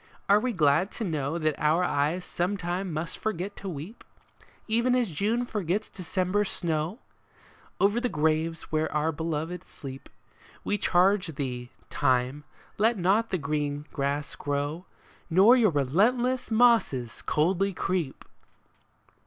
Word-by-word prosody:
Are 200 +1 +6
we 255 +3 -1
glad 160 0 +3
to 230 - -4
know 155 -4 -1
That 155 -2 +1
our 155 +4 +3
eyes 165 +3 0
sometime 180 0 -2
must 160 +2 -4
forget 205 -2 -3
to 195 - -6
weep, 170 +7 -8 0.6
Even 235 +3 +2
as 240 -7 +1
June 215 +10 0
forgets 210 -2 -2
December's 185 +3 -1
snow? 165 +2 -2 0.8
Over 205 +4 +3
the 250 - 0
graves 160 +1 0
where 155 0 0
our 155 +1 +1
beloved 160 +2 -3
sleep, 135 -1 -10 0.5
We 205 - -1
charge 180 -2 +2
thee. 125 -3 -4 0.2
Time, 130 +3 +1 0.3
let 225 +2 +3
not 195 +5 +2
the 185 - 0
green 145 -1 -2
grass 140 +1 -2
grow, 145 +4 -3 0.4
Nor 195 +8 +7
your 235 -5 +4
relentless 220 - +1
mosses 220 - +3
coldly 185 +6 +1
creep 180 -6 -2
175 Hz, 130 wpm, -27 LUFS, 150-205 Hz, 0.8 s, Nor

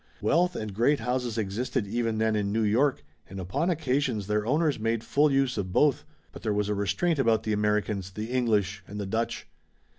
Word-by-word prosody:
Wealth 170 - +2
and 110 -2 -4
great 120 +8 +2
houses 125 -2 -2
existed 110 +2 -1
even 115 +1 -1
then 110 0 +1
in 100 -1 0
New 110 +1 +1
York 125 +6 +2 0.3
and 95 +1 -7
upon 135 - -1
occasion 140 -7 0
their 105 +2 -1
owners 150 0 +1
made 115 0 -1
full 150 +5 +3
use 135 -4 +1
of 95 -2 -3
both, 145 +8 +2 0.3
but - - -11
there 105 -2 -1
was 105 0 0
a - - +1
restraint 100 - 0
about 115 -4 +2
the 110 - -1
Americans, 105 -2 0
the 105 +5 -6
English 105 -5 0
and 105 +1 -7
the 100 - -3
Dutch. 115 +4 -2
110 Hz, 200 wpm, -27 LUFS, 105-130 Hz, 0.3 s, full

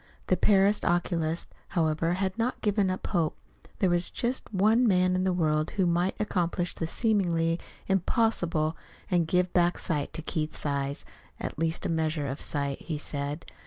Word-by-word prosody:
The - - +5
Paris 200 0 +4
oculist, 170 -2 0 0.2
however, 165 +1 +2
had 190 +1 -1
not 235 +2 -1
given 205 -2 +2
up 185 - -3
hope. 170 -6 0 0.4
There 190 - +2
was 175 0 +2
just 245 +1 -2
one 220 +5 +4
man 185 -2 +3
in 185 0 +1
the 190 - +2
world 155 -3 +1
who 190 - +3
might 175 +2 +1
accomplish 175 -3 0
the 165 - -3
seemingly 170 -6 +1 0.3
impossible 175 -5 +1 0.4
and 175 -3 +3
give 180 +1 +1
back 175 -1 +3
sight 150 -5 -2
to 160 - -4
Keith's 155 -1 -3
eyes 140 -1 -2 0.3
at - - -5
least 165 0 -1
a - - 0
measure 160 -2 0
of 140 +1 -4
sight, 140 -2 -2
he 160 -3 -4
said. 145 +1 -3
175 Hz, 165 wpm, -28 LUFS, 155-190 Hz, 0.4 s, The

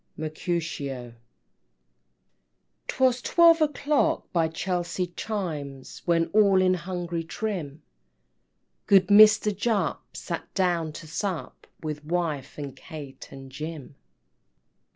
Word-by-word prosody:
MERCUTIO 155 -5 -3
I. - - -16 1.7
'Twas 255 -1 +2
twelve 335 +1 +5
o'clock 300 +1 +1
by 165 -2 +3
Chelsea 175 +1 -3
chimes, 150 -11 -5
When 170 -1 +3
all 200 -3 +5
in 185 0 +4
hungry 175 -1 -3
trim, 165 -5 -5 1.0
Good 195 -1 +5
Mister 215 +1 +7
Jupp 220 +1 -2
sat - - -5
down 175 -4 +1
to 165 - -9
sup 175 +2 -4 0.2
With 150 -1 -4
wife, 155 -4 -2
and 140 -2 -6
Kate, 145 -4 -10
and 135 -1 -11
Jim. 150 0 -7
175 Hz, 105 wpm, -26 LUFS, 155-200 Hz, 1.7 s, Mister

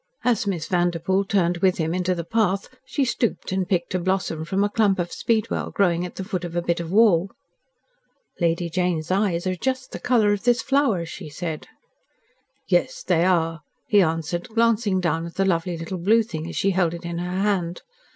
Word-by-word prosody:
As 230 -4 +1
Miss 175 -5 -2
Vanderpoel 175 +2 +1
turned 180 -3 +1
with 185 +1 +2
him 160 0 -1
into 180 0 0
the 170 - -3
path, 200 0 0
she 265 +1 -1
stooped 235 -4 -1
and 190 -1 -1
picked 175 -3 0
a 185 - +1
blossom 180 -3 -1
from 195 +3 0
a 205 - +1
clump 205 -2 +2
of 175 -1 -2
speedwell 225 -1 -1
growing 180 -3 +1
at - - -14
the 190 - -4
foot 185 -3 -3
of 175 -1 -6
a 175 - +1
bit 170 0 0
of 170 -1 -5
wall. 200 -4 +4 1.1
"Lady 170 0 +1
Jane's 175 -1 -1
eyes 190 -3 +1
are 185 0 0
just 260 +6 -2
the - - -6
colour 225 -5 +3
of 205 - -3
this 240 -1 +2
flower," 270 -11 +2
she 160 -1 -8
said. 160 0 -5 1.0
"Yes, - - +1
they 165 0 +2
are," 165 -3 +1 0.2
he 205 -2 +4
answered, 165 +3 -1
glancing 225 -4 +2
down 165 -1 -1
at 170 - -11
the 195 - +1
lovely 175 -1 0
little 165 +3 -5
blue 220 +6 +4
thing 160 -7 -6
as - - -7
she 195 - +2
held 175 -3 +1
it 170 0 -9
in 170 0 -3
her 180 +1 -3
hand. 185 -4 -1
185 Hz, 200 wpm, -23 LUFS, 170-205 Hz, 1.1 s, wall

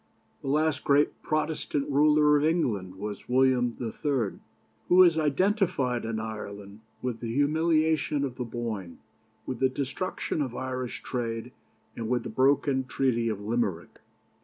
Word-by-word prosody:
"The - - -7
last 150 +1 +1
great 145 +1 +2
Protestant 155 -2 -1
ruler 150 +1 +4
of 145 - +2
England 115 - 0
was 105 +4 -7
William 125 -2 +3
III., 120 -1 -2 0.5
who 185 +1 +8
is 165 -3 +4
identified 155 - +1
in 110 -1 -2
Ireland 105 -2 -7 0.2
with 125 -3 -2
the 115 -1 -4
humiliation 155 +1 +2
of 125 -3 -6
the 125 - -2
Boyne, 115 -7 -5 0.5
with 130 -3 -4
the 130 - +3
destruction 140 +5 -3
of 130 -4 -3
Irish 130 -1 -4
trade, 115 -3 -3 0.4
and 115 -1 -4
with 125 -2 +1
the - - -5
broken 135 +2 +2
Treaty 120 -3 0
of 105 -2 -3
Limerick. 105 -6 -2
130 Hz, 140 wpm, -28 LUFS, 115-150 Hz, 0.5 s, who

